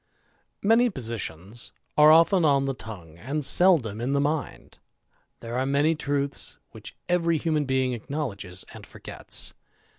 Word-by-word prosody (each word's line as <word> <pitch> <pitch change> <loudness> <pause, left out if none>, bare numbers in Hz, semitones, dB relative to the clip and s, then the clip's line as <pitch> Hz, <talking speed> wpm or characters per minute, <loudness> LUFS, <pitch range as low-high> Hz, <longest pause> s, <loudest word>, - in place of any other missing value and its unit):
ANY 235 +3 +5
positions 115 - -5 0.2
are 150 0 +7
often 165 +3 +5
on 140 -3 +3
the 135 - -1
tongue, 90 -10 -10
and 140 - -2
seldom 135 - +3
in 130 +3 -1
the 140 - +2
mind; 150 +2 -3 0.6
there 115 +1 -6
are 130 +1 0
many 145 +4 +2
truths 140 -2 -2
which - - -10
every 170 -2 +1
m 155 -3 +1
being 130 -1 0
acknowledges 105 -8 -5
and - - -12
forgets. - - -2
140 Hz, 140 wpm, -25 LUFS, 115-155 Hz, 0.6 s, are